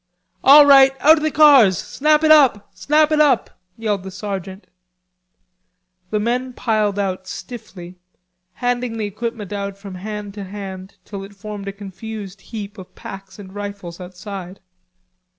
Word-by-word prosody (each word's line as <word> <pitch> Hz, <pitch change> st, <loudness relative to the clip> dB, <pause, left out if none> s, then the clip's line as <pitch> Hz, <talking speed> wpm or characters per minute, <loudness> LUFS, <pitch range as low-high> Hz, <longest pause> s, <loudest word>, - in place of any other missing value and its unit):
"All 290 Hz, +2 st, +9 dB
right, 270 Hz, -1 st, +6 dB
out 315 Hz, +3 st, +6 dB
of -, -, -3 dB
the 310 Hz, -, +2 dB
cars! 280 Hz, -, +6 dB
Snap 305 Hz, +2 st, +1 dB
it 310 Hz, -, +5 dB
up; 265 Hz, -10 st, +4 dB
snap 305 Hz, +1 st, +2 dB
it 305 Hz, 0 st, +3 dB
up!" 275 Hz, -6 st, +1 dB, 0.2 s
yelled 210 Hz, -4 st, -2 dB
the 190 Hz, -, -8 dB
sergeant. 195 Hz, -1 st, -6 dB, 1.4 s
The 215 Hz, -, -1 dB
men 250 Hz, +4 st, -2 dB
piled 215 Hz, -4 st, 0 dB
out 190 Hz, -2 st, -3 dB
stiffly, 185 Hz, -7 st, -9 dB, 0.5 s
handing 245 Hz, 0 st, -2 dB
the 215 Hz, -, -2 dB
equipment 215 Hz, 0 st, -5 dB
out 200 Hz, -1 st, -4 dB
from 200 Hz, -1 st, -10 dB
hand 205 Hz, +2 st, -7 dB
to 205 Hz, -1 st, -7 dB
hand 190 Hz, -1 st, -8 dB
till 200 Hz, -2 st, -7 dB
it 200 Hz, +1 st, -12 dB
formed 205 Hz, 0 st, -8 dB
a -, -, -2 dB
confused 200 Hz, 0 st, -9 dB
heap 210 Hz, -1 st, -8 dB
of 185 Hz, -, -13 dB
packs 195 Hz, +1 st, -10 dB
and 190 Hz, -2 st, -12 dB
rifles 200 Hz, -4 st, -7 dB
outside. 185 Hz, +1 st, -9 dB
205 Hz, 150 wpm, -20 LUFS, 195-245 Hz, 1.4 s, All